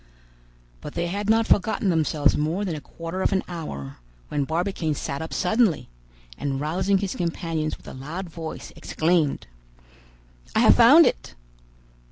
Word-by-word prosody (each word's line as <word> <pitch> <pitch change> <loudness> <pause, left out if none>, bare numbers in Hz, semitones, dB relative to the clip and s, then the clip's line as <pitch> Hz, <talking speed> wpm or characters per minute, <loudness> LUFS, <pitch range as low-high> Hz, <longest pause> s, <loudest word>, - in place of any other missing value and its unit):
But 150 - -8
they 170 - -1
had 200 +4 -3
not 225 +1 +4
forgotten 205 -1 +2
themselves 155 -3 +2
more 165 +7 -1
than 180 - -2
a 150 - -5
quarter 165 +5 -6
of - - +1
an 190 -1 +1
hour, 70 - -6 0.3
when 145 -2 -1
Barbicane 165 -1 -1
sat 140 +1 -4
up 160 - -6
suddenly, 195 - +1 0.5
and 135 -1 -2
rousing 185 +7 +1
his 195 -1 -2
companions 165 -2 -2
with - - -19
a - - -8
loud 155 +8 -6
voice, 165 -1 -8
exclaimed— 160 -3 0 1.1
"I - - +4
have - - +7
found - - +8
it!" - - -2
165 Hz, 155 wpm, -24 LUFS, 150-190 Hz, 1.1 s, found